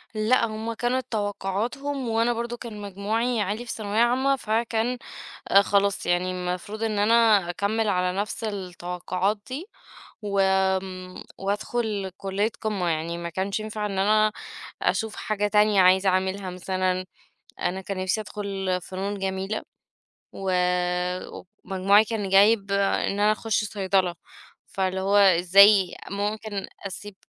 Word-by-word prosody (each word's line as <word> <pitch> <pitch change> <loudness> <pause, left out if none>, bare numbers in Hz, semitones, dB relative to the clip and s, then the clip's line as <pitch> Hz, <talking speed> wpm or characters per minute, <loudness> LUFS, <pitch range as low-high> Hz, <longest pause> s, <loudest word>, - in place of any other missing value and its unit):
لأ، 225 +3 +3
هُم 220 +1 -4
كانت 250 +3 -1
توقعاتهُم، 230 +6 -2
وأنا 230 +2 +2
برضه 235 +1 -4
كان 220 -4 -8
مجموعي 215 +4 -1
عالي 210 +5 -2
في - - -5
ثانوية 210 0 -2
عامة، 260 +4 +3
فكان 230 0 -1 0.6
خلاص 200 -1 +1
يعني 175 +1 +1
المفروض 180 +4 -4
إن 215 -2 0
أنا 215 -3 +4
أكَمِّل 210 +5 0
على 180 -1 0
نَفس 210 +2 -3
التوقعات 185 0 -2
دي، 280 +8 -5 0.6
وآمم 190 -2 0
وأدخُل 205 0 -2
كلية 200 +3 -1
قِمَّة 200 -5 -1
يعني، 165 +1 -2
ما 170 0 -5
كانش 190 +5 -2
ينفع 215 0 -4
إن 200 -2 -3
أنا 215 +2 +3 0.5
أشوف 220 -1 0
حاجة 210 -1 -1
تانية 210 -1 +4
عايزة 190 +1 +5
أعملها 190 +1 -1
مثلًا، 185 0 -1 0.6
أنا 190 +2 -1
كان 190 0 -5
نفسي 185 +3 0
أدخُل 195 -3 -3
فنون 195 +3 -4
جميلة، 195 +2 -3 0.7
ومجموعي 180 +2 0
كان 210 -3 -3
جايب 200 +1 +4
إن 200 0 +1
أنا 210 +1 +4
أخُش 220 0 0
صيدلة، 190 -3 0 0.5
فاللي 190 0 -2
هو 200 +2 +2
إزّاي 195 +1 +6 0.2
ممكن 205 0 -3 0.2
أسيب 200 +1 -9
200 Hz, 125 wpm, -25 LUFS, 185-215 Hz, 0.7 s, إزّاي